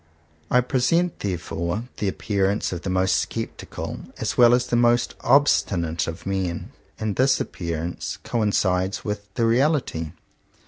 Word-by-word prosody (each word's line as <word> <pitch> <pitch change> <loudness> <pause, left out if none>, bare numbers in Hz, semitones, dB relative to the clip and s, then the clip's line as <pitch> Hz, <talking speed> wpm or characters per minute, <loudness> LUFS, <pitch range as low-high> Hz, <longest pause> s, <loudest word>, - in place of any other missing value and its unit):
I 125 - +5
present 145 +8 +1
therefore 90 +1 -3
the 105 - -1
appearance 100 +1 0
of 85 - -4
the 95 - -4
most 95 +1 +1
sceptical - - -5 0.2
as - - -2
well 120 0 +7
as 125 0 0
the 125 - -1
most 120 0 +3
obstinate 95 - +2
of 85 0 -6
men. 95 -3 -2 0.3
And 110 -2 -2
this 130 +1 +4
appearance 85 0 -4
coincides 95 -4 0
with 105 -1 -4
the 115 -2 +2
reality. 115 - +1
105 Hz, 135 wpm, -24 LUFS, 90-120 Hz, 0.3 s, well